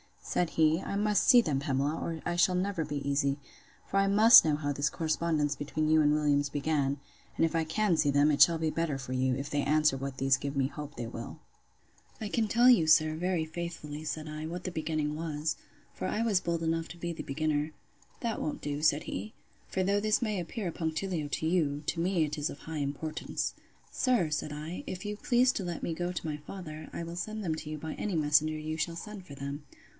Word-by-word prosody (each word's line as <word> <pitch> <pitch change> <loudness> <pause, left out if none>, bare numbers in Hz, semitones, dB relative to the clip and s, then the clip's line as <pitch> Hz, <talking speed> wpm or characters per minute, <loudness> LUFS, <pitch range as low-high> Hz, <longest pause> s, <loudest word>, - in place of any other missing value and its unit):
Said 175 -2 0
he, 160 +1 +3
I 200 - -4
must 210 -1 +2
see 245 -2 +8
them, 145 -10 0
Pamela, 140 +2 0
or 165 -2 -4
I 175 0 -1
shall 180 +1 +4
never 180 -3 -1
be 145 -1 -4
easy; 140 0 +1 0.5
for - - -2
I 195 0 +4
must 215 +3 +8
know 155 -2 +2
how 145 -1 -2
this 145 +1 0
correspondence 155 -2 0
between 155 +1 -1
you 155 0 +5
and 150 0 +4
Williams 145 -1 +2
began: 140 -1 -1 0.3
and - - +3
if 165 - -2
I 165 -1 +1
can 185 +2 +1
see 145 - +3
them, 145 +2 +4
it 145 - +1
shall 170 -1 +7
be 160 0 0
better 160 -3 -1
for 135 -1 -7
you, 130 0 +1
if 140 +2 -4
they 145 0 0
answer 150 -1 +3
what 135 0 -5
these 135 0 +3
give 140 +1 -4
me 135 -1 +2
hope 145 +1 -8
they 120 - -4
will. 115 0 -7 0.8
I 215 - -3
can 220 +1 +1
tell 240 +4 +5
you, 200 -11 +6
sir, 155 0 +5
very 175 0 0
faithfully, 155 -2 -6
said 155 0 -4
I, 155 +1 -5
what 175 +2 -5
the 185 - -3
beginning 155 -2 -2
was; 155 -1 -2 0.4
for - - -4
I 220 - 0
was 215 -5 +3
bold 170 -2 -2
enough 165 0 0
to 175 - -9
be 170 0 -3
the 165 - -6
beginner. 155 +1 -1 0.5
That 230 -2 -2
won't 150 - -3
do, 145 0 -3
said 155 -1 +3
he; 100 +3 -5 0.3
for 190 - -1
though 200 +2 +2
this 215 +2 +2
may 215 -5 -1
appear 180 +3 -4
a - - -4
punctilio 160 0 -2
to - - -1
you, 155 -4 +1
to 165 - -1
me 175 -1 +2
it 150 0 -3
is 150 0 -1
of - - -8
high 160 0 -6
importance. 145 +2 -3 0.4
Sir, 245 - +2
said 150 0 -2
I, 155 +4 -6
if 185 +3 -5
you 210 0 -3
please 245 +3 +3
to 195 - -3
let 175 -1 -4
me 165 - -1
go 175 +2 -3
to 170 - -4
my 150 -1 -2
father, 155 0 -8
I - - -4
will 170 +1 -7
send 215 +4 -4
them 165 -4 0
to 155 - -7
you 155 - -4
by 155 +1 -6
any 205 -4 -2
messenger 155 0 +3
you 155 +1 -4
shall 165 +1 -2
send 205 +1 -8
for 140 - -9
them. 140 +1 -6
155 Hz, 235 wpm, -30 LUFS, 145-175 Hz, 0.8 s, see